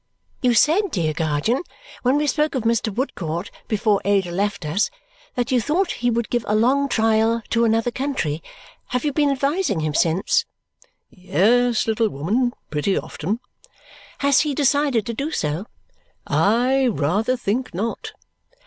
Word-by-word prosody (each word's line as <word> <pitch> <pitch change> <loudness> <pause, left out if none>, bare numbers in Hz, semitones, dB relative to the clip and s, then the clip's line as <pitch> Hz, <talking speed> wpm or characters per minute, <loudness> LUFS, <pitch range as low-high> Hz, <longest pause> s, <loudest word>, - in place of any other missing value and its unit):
"You 250 -3 +3
said, 350 - +4
dear 165 - -1
guardian, 160 - 0 0.4
when 260 +3 +2
we 300 - +1
spoke 300 0 0
of 255 - -1
Mr. 230 -1 +1
Woodcourt 185 - -3 0.2
before 215 -2 +1
Ada 195 -3 +1
left 200 -1 -2
us, 155 +8 +1 0.5
that 245 0 -1
you 250 -2 +3
thought 345 - 0
he 245 - -1
would 235 -1 -1
give 240 -1 0
a 210 - +1
long 270 +6 +2
trial 225 0 +2
to 230 0 +3
another 225 +1 +1
country. 245 - -2 0.5
Have 250 +3 -2
you 290 - 0
been 290 0 +2
advising 275 - 0
him 155 -1 -1
since?" 195 - +2 0.7
"Yes, 220 +6 +2
little 220 0 +1
woman, 220 - -1 0.2
pretty 155 +6 0
often." 205 +10 -3 0.8
"Has 280 -1 +3
he 295 -3 0
decided 280 -5 +2
to 235 - -3
do 275 +7 -3
so?" 165 - -2 0.6
"I 250 +5 +2
rather 210 - 0
think 240 +3 -2
not." 220 +5 -3
230 Hz, 150 wpm, -22 LUFS, 195-265 Hz, 0.8 s, said